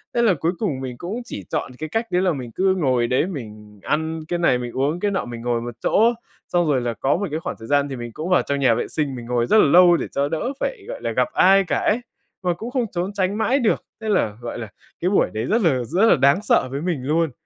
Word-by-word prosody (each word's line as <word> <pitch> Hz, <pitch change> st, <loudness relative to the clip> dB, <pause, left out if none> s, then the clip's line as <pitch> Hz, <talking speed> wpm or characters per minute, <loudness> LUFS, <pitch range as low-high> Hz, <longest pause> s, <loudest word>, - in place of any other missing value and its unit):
Thế 235 Hz, -, +3 dB
là 220 Hz, -5 st, +4 dB
cuối 165 Hz, +2 st, 0 dB
cùng 150 Hz, -12 st, -2 dB
mình 125 Hz, -2 st, -6 dB
cũng 205 Hz, -, -5 dB
chỉ -, -, -7 dB
chọn -, -, -2 dB
cái 155 Hz, 0 st, -4 dB
cách 225 Hz, +5 st, -1 dB
đấy 180 Hz, +1 st, +2 dB
là 180 Hz, -3 st, +2 dB
mình 125 Hz, -4 st, -6 dB
cứ 190 Hz, +5 st, +1 dB
ngồi 130 Hz, -9 st, +1 dB
đấy, 130 Hz, +8 st, +1 dB
mình 105 Hz, -, -9 dB
ăn 160 Hz, +1 st, -1 dB
cái 175 Hz, -1 st, -2 dB
này, 150 Hz, -7 st, +3 dB
mình 120 Hz, -1 st, -5 dB
uống 145 Hz, +6 st, 0 dB
cái 205 Hz, +1 st, 0 dB
nọ, 195 Hz, -, -1 dB
mình 120 Hz, -1 st, -7 dB
ngồi 120 Hz, -1 st, -1 dB
một 120 Hz, -1 st, -6 dB
chỗ, 230 Hz, +3 st, +4 dB, 0.3 s
xong 175 Hz, -2 st, +1 dB
rồi 135 Hz, -4 st, +2 dB
là 120 Hz, -1 st, -2 dB
có 135 Hz, +9 st, 0 dB
một 200 Hz, -, -2 dB
cái 155 Hz, -, -2 dB
khoảng -, -, -5 dB
thời 115 Hz, -, -9 dB
gian 145 Hz, 0 st, +2 dB
thì 135 Hz, -, -4 dB
mình 120 Hz, -1 st, -7 dB
cũng 160 Hz, +8 st, -5 dB
vào 180 Hz, -, +4 dB
trong 140 Hz, 0 st, -2 dB
nhà 130 Hz, -4 st, +4 dB
vệ 120 Hz, -, -2 dB
sinh 145 Hz, -4 st, -2 dB
mình 120 Hz, -, -8 dB
ngồi 120 Hz, 0 st, 0 dB
rất 220 Hz, -, +4 dB
là 215 Hz, -, +6 dB
lâu 175 Hz, +3 st, +6 dB
để -, -, -3 dB
cho 140 Hz, +1 st, 0 dB
đỡ 245 Hz, -, -2 dB
phải, -, -, -3 dB
gọi -, -, -7 dB
là, -, -, -2 dB
gặp -, -, +1 dB
ai 195 Hz, +1 st, +5 dB
cả 180 Hz, -, -1 dB
ấy, 230 Hz, +4 st, +1 dB, 0.4 s
mà 180 Hz, -, +1 dB
cũng 225 Hz, +8 st, -7 dB
không 255 Hz, -3 st, 0 dB
trốn 180 Hz, +3 st, -3 dB
tránh 200 Hz, +1 st, 0 dB
mãi 255 Hz, +6 st, +2 dB
được. 230 Hz, -, +1 dB, 0.2 s
Thế 220 Hz, -, -3 dB
là, 110 Hz, -, +1 dB
gọi 120 Hz, -, -5 dB
là, 110 Hz, -, -6 dB, 0.3 s
cái 180 Hz, -, +1 dB
buổi 200 Hz, -, +2 dB
đấy 110 Hz, +2 st, -2 dB
rất 225 Hz, +2 st, +1 dB
là 135 Hz, -9 st, +2 dB
rất 180 Hz, -, 0 dB
là -, -, +6 dB
đáng 140 Hz, +7 st, +4 dB
sợ 130 Hz, -, +3 dB
với 140 Hz, +2 st, -3 dB
mình 165 Hz, -7 st, -2 dB
luôn. 155 Hz, +2 st, +1 dB
160 Hz, 285 wpm, -22 LUFS, 125-190 Hz, 0.4 s, là